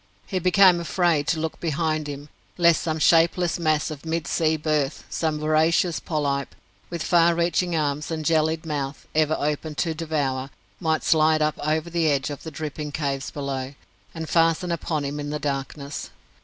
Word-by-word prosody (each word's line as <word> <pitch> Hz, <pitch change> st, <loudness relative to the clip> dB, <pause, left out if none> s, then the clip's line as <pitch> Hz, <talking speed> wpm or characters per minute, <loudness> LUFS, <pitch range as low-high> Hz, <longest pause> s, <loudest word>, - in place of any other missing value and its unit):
He 190 Hz, -, -2 dB
became 185 Hz, 0 st, +5 dB
afraid 170 Hz, -3 st, +1 dB
to 165 Hz, -, +1 dB
look 160 Hz, 0 st, -3 dB
behind 155 Hz, -1 st, -1 dB
him, 145 Hz, +1 st, -7 dB, 0.3 s
lest 170 Hz, -2 st, +4 dB
some 160 Hz, -1 st, -1 dB
shapeless 170 Hz, +2 st, +3 dB
mass 155 Hz, -3 st, +1 dB
of 145 Hz, -2 st, -8 dB
mid 165 Hz, -1 st, -2 dB
sea 160 Hz, +2 st, +1 dB
birth 150 Hz, -2 st, -1 dB
some 160 Hz, -2 st, -1 dB
voracious 155 Hz, +3 st, +2 dB
polype, 140 Hz, -3 st, -2 dB, 0.3 s
with 170 Hz, -2 st, -4 dB
far 170 Hz, -1 st, +4 dB
reaching 170 Hz, +1 st, +1 dB
arms 150 Hz, -1 st, -1 dB
and 160 Hz, -2 st, -3 dB
jellied 160 Hz, 0 st, +1 dB
mouth 145 Hz, -3 st, -4 dB
ever 155 Hz, 0 st, +2 dB
open 150 Hz, +1 st, -2 dB
to 165 Hz, +1 st, 0 dB
devour 145 Hz, -5 st, -2 dB, 0.3 s
might 160 Hz, -3 st, 0 dB
slide 155 Hz, -1 st, +4 dB
up 150 Hz, 0 st, -1 dB
over 155 Hz, +3 st, -1 dB
the 165 Hz, -2 st, +2 dB
edge 140 Hz, 0 st, 0 dB
of 145 Hz, -, -7 dB
the 160 Hz, -, -7 dB
dripping 150 Hz, -1 st, -5 dB
caves 140 Hz, -2 st, -2 dB
below, 140 Hz, -1 st, -4 dB, 0.4 s
and 160 Hz, -1 st, -5 dB
fasten 165 Hz, +2 st, +2 dB
upon 155 Hz, -3 st, -2 dB
him 145 Hz, +1 st, -4 dB
in 145 Hz, 0 st, -4 dB
the 150 Hz, -, -2 dB
darkness. 140 Hz, 0 st, -4 dB
155 Hz, 170 wpm, -24 LUFS, 145-165 Hz, 0.4 s, became